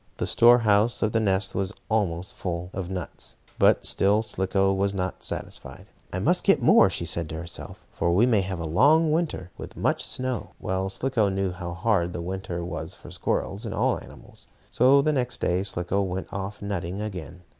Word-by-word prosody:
The - - -1
store 120 +1 +6
house 110 0 +2
of 110 - +1
the 115 - +2
nest 95 -2 +1
was 95 +1 -2
almost 95 -5 -1
full 90 0 -4
of 95 -2 -4
nuts, 90 -3 -4 0.2
but - - +4
still 105 +3 +2
Slicko 95 -2 0
was 100 +1 0
not 95 -1 -3
satisfied. - - -6 0.3
"I - - -3
must - - +2
get - - +4
more," - - +6
she - - -3
said 85 -2 -2
to 80 - -5
herself, 85 +2 -6
"for 85 - 0
we 100 +7 +4
may 115 -5 +3
have 95 -1 -4
a 85 - -3
long 145 - +4
winter, 155 - -1
with - - -9
much - - +1
snow." 130 -4 -3
Well, 95 +1 -2
Slicko 110 +1 0
knew 95 -1 -1
how 90 -1 -6
hard 95 -3 +1
the 85 - -4
winter 90 -1 -4
was 90 - -5
for - - -13
squirrels, 100 +4 -2
and 115 - -4
all - - +1
animals. - - -14 0.2
So 135 +3 +5
the 155 - +2
next 125 -3 -1
day 90 +1 +1
Slicko 95 0 -1
went 95 -1 -4
off 100 +1 -5
nutting 95 -2 -3
again. 90 -4 -6
95 Hz, 195 wpm, -26 LUFS, 90-110 Hz, 0.3 s, store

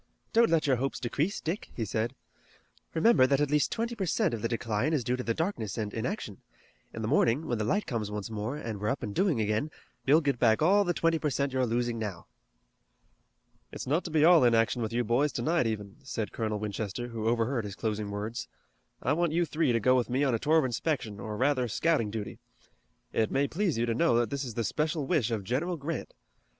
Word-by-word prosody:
"Don't 230 0 +5
let 165 -2 +2
your 135 -3 +3
hopes 135 +3 -2
decrease, 145 - -1
Dick," 170 +6 -4
he 115 - -2
said. 110 +5 -2 0.8
"Remember 160 - +5
that 140 0 +2
at 145 -1 +1
least 150 -1 +2
twenty 230 +1 -2
per 195 -4 -2
cent 200 - +1
of 115 - -3
the 115 - 0
decline 115 +4 -1
is 145 -6 +1
due 125 +2 0
to 125 - -4
the 115 -2 -1
darkness 160 - -2
and 105 -2 -3
inaction. 115 - -4 0.5
In 110 - -6
the - - -1
morning, 135 +2 +2
when 120 - -2
the - - 0
light 205 - 0
comes 110 -4 -3
once 105 -1 -4
more, 110 +5 -4
and 110 -7 -5
we're 105 - 0
up 135 - -2
and 105 -3 -4
doing 180 - +2
again, 110 +7 0 0.4
you'll 150 +4 +6
get 140 -6 -1
back 110 -2 +4
all 200 +6 +4
the 175 -3 -1
twenty 165 -1 +2
per 150 - 0
cent 140 0 -1
you're 130 -1 +1
losing 120 0 -1
now." 100 -6 -5 1.5
"It's - - -6
not 155 +7 +1
to - - -4
be 155 -1 +4
all 170 -4 +7
inaction 115 0 +3
with 110 -1 -2
you 120 +1 0
boys 125 +6 +2
tonight, 165 -5 +1
even," 105 -2 -4
said 115 -5 -4
Colonel 110 -2 -2
Winchester, 105 +3 -4
who 115 -2 -3
overheard 115 +1 +1
his 100 -2 -6
closing 105 -2 -2
words. 105 +3 -4 0.6
"I 145 - +2
want 170 0 +1
you 175 +1 +2
three 155 -4 +1
to 115 - +2
go 125 +4 +4
with 125 -1 +1
me 130 +3 +1
on 135 -3 +2
a 115 - +1
tour 155 +5 +3
of 155 - +3
inspection 120 -4 -2
or 105 +1 -5
rather 130 -1 +2
scouting 130 -2 +1
duty. 105 -1 -5 0.7
It 110 -1 +1
may 140 +1 +1
please 175 - -1
you 115 - +1
to 115 - 0
know 165 +2 +3
that 120 +1 +1
it 140 0 -2
is 120 -4 -6
the 115 - 0
special 150 +5 -1
wish 130 -4 +1
of 110 -4 -2
General 155 - -1
Grant. 150 0 -5
125 Hz, 230 wpm, -29 LUFS, 110-155 Hz, 1.5 s, all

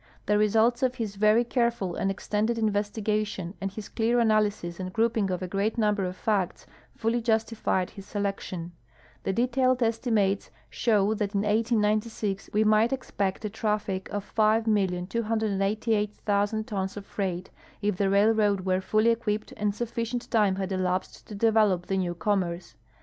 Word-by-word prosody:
The 210 +1 +2
results 225 +4 +3
of 255 -1 +1
his 220 -5 -4
very 215 +3 +4
careful 235 -6 0
and 195 - -1
ex 195 - -6
tended 215 +3 +1
investigation 210 -3 -1
and 195 0 -2
his 205 +1 -7
clear 235 +1 +1
analysis 210 -6 +1
and 185 0 -4
groujnng 225 -1 +1
of 185 0 -2
a - - -3
great 200 +5 -1
number 210 -3 +1
of 180 0 -4
facts 195 -3 -1 0.3
fully 230 +1 0
justified 220 -4 0
his 195 -2 -11
selection. 195 -4 -3 0.5
The - - -1
detailed 255 +3 +2
estimates 225 -4 +1 0.2
show 210 -2 +2
that 210 -1 -2
in 200 - +2
1896 215 -1 0
we 210 +1 +3
might 215 +2 +4
expect 205 -7 -2
a - - -1
traffic 210 -3 -2
of 205 -1 -5
5,288,000 215 0 +1
tons 195 -2 -3
of 200 - -7
freight, 185 -3 -3 0.3
if 205 -2 0
the 195 0 +2
railroad 205 -1 +3
Avere 185 0 +1
fully 215 +4 +3
equipped 215 -2 -2
and 205 -1 -1
sufficient 235 +1 -3
time 210 -4 +3
had 190 0 -3
elai)sed 185 -1 -2
to 210 - -8
develop 210 -4 +3
the 195 - -1
ncAV 175 -2 -2
commerce. 180 -3 -1
210 Hz, 155 wpm, -27 LUFS, 195-225 Hz, 0.5 s, very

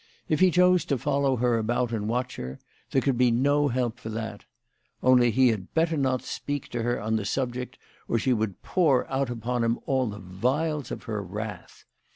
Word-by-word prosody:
If 155 - +1
he 185 - +6
chose 180 +1 +4
to 140 - 0
follow 140 +2 +1
her 120 -1 +2
about 120 +2 0
and 110 -2 -2
watch 125 +2 -2
her, 65 +1 -6 0.3
there 135 - +1
could 130 -3 +1
be 125 -1 +5
no 145 +5 +3
help 125 -3 -1
for 110 - -7
that. 110 0 -5 0.6
Only 125 -1 +5
he 125 +2 +4
had 100 -5 -3
better 165 0 +2
not 130 -3 0
speak 145 -1 -4
to 120 - -3
her 120 +1 0
on 110 +1 0
the 110 - -2
sub 120 +4 -1
ject, 125 0 -6 0.3
or 115 - +1
she 125 +3 +2
would 110 -4 -2
pour 155 -9 +2
out 135 -1 0
upon 120 0 -2
him 115 0 +1
all 130 -2 +1
the 105 -1 -5
vials 130 - -1
of - - -6
her 110 -2 -3
wrath 105 0 -7
125 Hz, 205 wpm, -26 LUFS, 110-135 Hz, 0.6 s, he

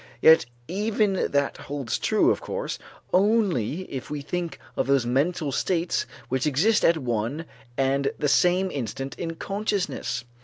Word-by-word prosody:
Yet 160 -6 +7 0.2
even 205 0 +1
that 140 -1 0
holds 140 -4 -3
true, - - +3
of - - -1
course, - - -4 0.3
only 185 - +2
if 135 -8 -7
we 150 -1 -3
think 170 +3 -4 0.2
of - - 0
those 135 -3 +3
mental 140 +4 0
states 170 +5 0 0.2
which 130 +2 0
exist 190 +11 +3
at 170 - +5
one 125 +3 -2 0.3
and 135 +1 +1
the 150 - 0
same 180 +5 +3
instant 135 +1 -4
in 165 -1 -3
consciousness. 200 - -2
155 Hz, 145 wpm, -25 LUFS, 135-185 Hz, 0.3 s, Yet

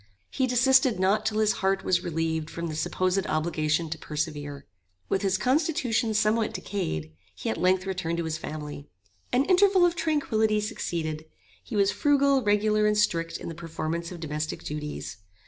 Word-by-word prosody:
He 260 - +1
desisted 255 -2 +4
not 195 +3 +2
till 215 - -1
his 215 -1 +3
heart 190 0 +1
was 180 -1 +1
relieved 160 -1 -2
from 170 - -5
the 160 -2 -4
supposed 185 +4 0
obligation 155 0 0
to 160 - -4
persevere. 145 -2 -4 0.4
With 190 - +1
his 195 -1 +1
constitution 250 - +1
somewhat 215 +1 +2
decayed, 80 - -3 0.2
he 90 - -3
at 110 - -3
length 185 +1 +3
returned 180 -3 -2
to 170 - -1
his 160 -1 -3
family. 150 -2 -7 0.4
An 255 +3 +3
interval 375 0 +5
of 350 - +2
tranquillity 220 -10 +1
succeeded. 160 -6 -3 0.4
He 230 - -7
was 200 -1 +3
frugal, 280 -2 +3
regular, 210 0 +2
and 210 0 +2
strict 165 -5 +1
in - - -8
the 165 - -5
performance 165 +1 -4
of 175 - -8
domestic 155 -1 -4
duties. 150 -5 -5
185 Hz, 165 wpm, -27 LUFS, 160-220 Hz, 0.4 s, interval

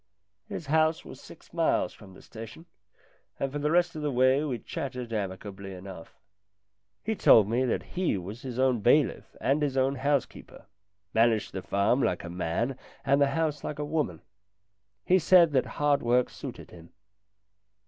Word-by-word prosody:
His 170 - -6
house 155 +2 +2
was - - -11
six - - -15
miles - - +1
from 95 -2 -15
the - - -15
station, 115 +8 -10 0.7
and 135 - -1
for 145 - -3
the 150 +1 0
rest 175 +1 +2
of 155 - -5
the 150 - -1
way 130 +3 +3
we 135 -5 -2
chatted 125 -3 -6
amicably 95 -1 -5
enough. 90 -2 -10 0.9
He 220 - -1
told 110 - +6
me 120 +4 +1
that 125 - -1
he 180 - -1
was 100 +6 -7
his 125 -3 -6
own 130 -2 +2
bailiff 125 +6 +2
and 140 +3 +1
his 140 -2 -1
own 135 +1 +1
housekeeper 140 +1 -2 0.5
managed 115 -1 +2
the 95 - -4
farm 100 +8 +1
like 90 - 0
a 85 - -7
man 95 +9 -2 0.3
and 140 +1 +3
the 140 - +5
house 155 -3 -1
like 150 - -4
a 150 - -3
woman. 145 - -2 0.8
He 185 +1 +4
said 175 -1 +6
that 130 -3 +1
hard 145 -1 +2
work 120 +1 +2
suited - - -9
him. 85 -1 -14
130 Hz, 170 wpm, -28 LUFS, 105-150 Hz, 0.9 s, told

